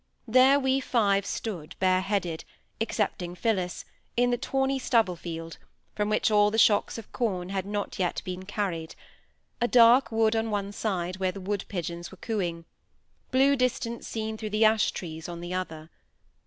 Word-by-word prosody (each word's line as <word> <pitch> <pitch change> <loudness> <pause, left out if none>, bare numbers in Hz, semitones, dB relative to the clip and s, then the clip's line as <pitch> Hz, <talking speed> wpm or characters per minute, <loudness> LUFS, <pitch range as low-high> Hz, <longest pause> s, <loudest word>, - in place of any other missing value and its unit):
There 260 +4 +6
we 265 0 +2
five 200 -6 +1
stood, 180 -9 -5
bareheaded, 185 -2 +1 0.4
excepting 195 -5 -2
Phillis, 185 -3 -1 0.3
in 245 0 +3
the 245 - +1
tawny 270 0 0
stubble 230 -8 +2
field, 165 -1 -7 0.3
from 210 0 -1
which 215 +1 +2
all 210 0 +5
the 220 - -2
shocks 215 -1 +4
of 225 - -10
corn 185 -7 -2
had 195 -1 -3
not 205 -1 -3
yet 180 -2 0
been 185 0 -5
carried—a 195 +3 -5
dark 240 +2 +6
wood 225 0 +2
on 225 0 0
one 200 -1 -2
side, 185 -4 -2
where 190 -1 0
the 195 - -8
woodpigeons 180 -3 -4
were 190 - -13
cooing; 175 -7 -3 0.6
blue 270 +2 +4
distance 250 -2 -1
seen 220 -1 -3
through 215 - -4
the 215 +1 +3
ash 220 -1 +4
trees 160 -1 -6
on 170 -1 -6
the 175 +1 -5
other. 165 -3 -5
205 Hz, 160 wpm, -27 LUFS, 180-225 Hz, 0.6 s, There